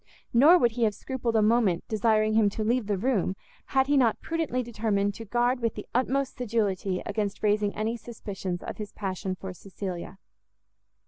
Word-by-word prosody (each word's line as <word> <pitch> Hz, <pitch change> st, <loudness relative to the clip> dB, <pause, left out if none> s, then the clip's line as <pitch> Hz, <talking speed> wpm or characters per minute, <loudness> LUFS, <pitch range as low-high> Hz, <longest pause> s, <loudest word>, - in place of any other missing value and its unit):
Nor 295 Hz, +9 st, +7 dB
would 240 Hz, -8 st, +3 dB
he 235 Hz, +1 st, -1 dB
have 210 Hz, -2 st, 0 dB
scrupled 245 Hz, -2 st, -3 dB
a 220 Hz, -, +4 dB
moment 215 Hz, -6 st, +3 dB
desiring 215 Hz, 0 st, +2 dB
him 215 Hz, -2 st, +4 dB
to 215 Hz, +2 st, -3 dB
leave 235 Hz, 0 st, +1 dB
the 205 Hz, -2 st, 0 dB
room, 200 Hz, -4 st, 0 dB, 0.3 s
had 265 Hz, -1 st, +3 dB
he 290 Hz, +1 st, +2 dB
not 235 Hz, -5 st, +3 dB
prudently 320 Hz, -7 st, -2 dB
determined 210 Hz, -3 st, 0 dB
to 225 Hz, -, -8 dB
guard 240 Hz, +4 st, +1 dB
with 230 Hz, -2 st, -1 dB
the 210 Hz, -, -6 dB
utmost 260 Hz, +2 st, 0 dB
sedulity 200 Hz, -6 st, -1 dB
against 205 Hz, -1 st, -3 dB
raising 210 Hz, -1 st, +2 dB
any 220 Hz, +2 st, -1 dB
suspicions 200 Hz, -6 st, -6 dB
of -, -, -6 dB
his 210 Hz, -2 st, -6 dB
passion 190 Hz, -1 st, -3 dB
for 185 Hz, 0 st, -7 dB
Cecilia. 185 Hz, -1 st, -7 dB
215 Hz, 180 wpm, -27 LUFS, 200-240 Hz, 0.3 s, Nor